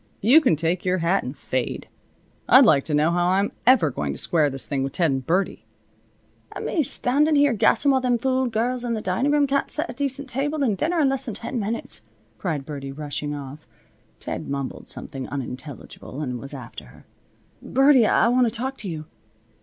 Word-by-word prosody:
You 255 +10 +6
can 255 - +3
take 165 +3 -1
your 185 0 +1
hat 175 +3 +1
and 130 +3 -7
fade. 130 -2 -3 0.6
I'd - - +8
like 140 - +4
to 155 - -3
know 155 +3 +3
how 175 0 +1
I'm 195 +2 +1 0.2
ever 225 - +5
going 75 - -3
to - - -8
square 155 -4 +2
this 135 -1 -2
thing 140 -2 -2
with 135 0 -4
Ted 170 -4 +2
and 135 -1 -2
Birdie." 180 +8 -1 0.9
"An' - - -6
me 335 - +1
standin' 295 +3 +1
here 285 -2 +4
gassin' 230 +5 +3
while 265 -1 +2
them 250 -1 +2
fool 260 +1 0
girls 240 +2 -1
in 235 -1 -1
the 215 - -4
dinin' 190 +10 0
room 295 -1 +3
can't 280 0 0
set 310 +3 -1
a - - -7
table - - -26
decent, 275 -2 -3 0.3
and 205 - 0
dinner 330 - 0
in 285 - +4
less 270 0 -1
than 230 -6 -5
ten 235 +3 -4
minutes," 215 - -2 0.4
cried 150 -2 -3
Birdie, 140 -2 -6
rushing 145 +1 -4
off. 145 +1 -9 0.5
Ted - - -5
mumbled 140 -1 -5
something 135 -4 -6
unintelligible 135 +1 -7
and 125 -4 -3
was 140 +3 -6
after 125 - -9
her. 60 - -18 0.6
"Birdie! 270 -3 +4
I - - +3
want 245 +1 +3
to - - -1
talk 260 +4 -4
to 200 - -5
you." 155 -2 -6
190 Hz, 205 wpm, -23 LUFS, -, 0.9 s, I'd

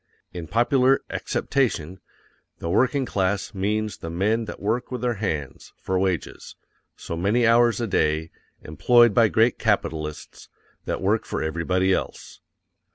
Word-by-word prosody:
_ - - -51 0.3
In 85 -2 -7
popular 125 - +3
acceptation, 95 - -2 0.6
the 85 - -4
working 130 +6 +2
class 100 0 -1
means 105 +2 -2
the 80 - -7
men 105 +7 0
that 105 - -8
work 110 +5 -2
with 125 -2 -4
their 125 -1 0
hands, 75 -9 -4
for 95 -1 -2
wages, 95 -5 -3 0.4
so 85 - -6
many 105 +8 +1
hours 120 +1 +4
a 120 - -1
day, 80 -5 0 0.3
employed 120 +8 +4
by 115 +1 +5
great 115 +3 +2
capitalists; 75 -1 -3 0.4
that - - -3
work - - +1
for - - -4
everybody 90 +4 0
else. - - -5
100 Hz, 145 wpm, -24 LUFS, 85-120 Hz, 0.6 s, by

